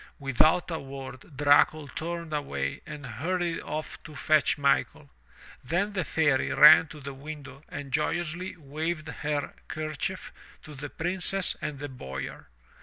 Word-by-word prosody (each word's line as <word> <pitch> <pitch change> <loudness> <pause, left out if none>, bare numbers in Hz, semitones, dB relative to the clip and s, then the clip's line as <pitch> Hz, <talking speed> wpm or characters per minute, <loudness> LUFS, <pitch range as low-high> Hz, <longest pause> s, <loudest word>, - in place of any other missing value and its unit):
Without 150 +6 +3
a 160 - -2
word, 135 +1 -9
Dracul 145 +1 +5
turned 170 -1 -4
away 70 - -2
and 150 -2 -7
hurried 170 +8 -1
off 155 +1 -5
to 155 - -11
fetch 155 +1 +3
Michael. 140 -1 +1 0.5
Then 175 +9 0
the 185 -3 0
Fairy 145 -4 +2
ran 155 +2 +9
to 150 +1 -10
the 140 0 -6
window 140 -1 -9
and 145 -2 -6
joyously 175 +5 -1
waved 155 +2 -3
her 145 -1 -2
kerchief 155 +4 -4 0.3
to 150 - -10
the 145 +1 -6
Princess 180 +3 -2
and 150 -2 -3
the 145 +1 -5
Boyar. 70 - -7
150 Hz, 140 wpm, -28 LUFS, 140-165 Hz, 0.5 s, ran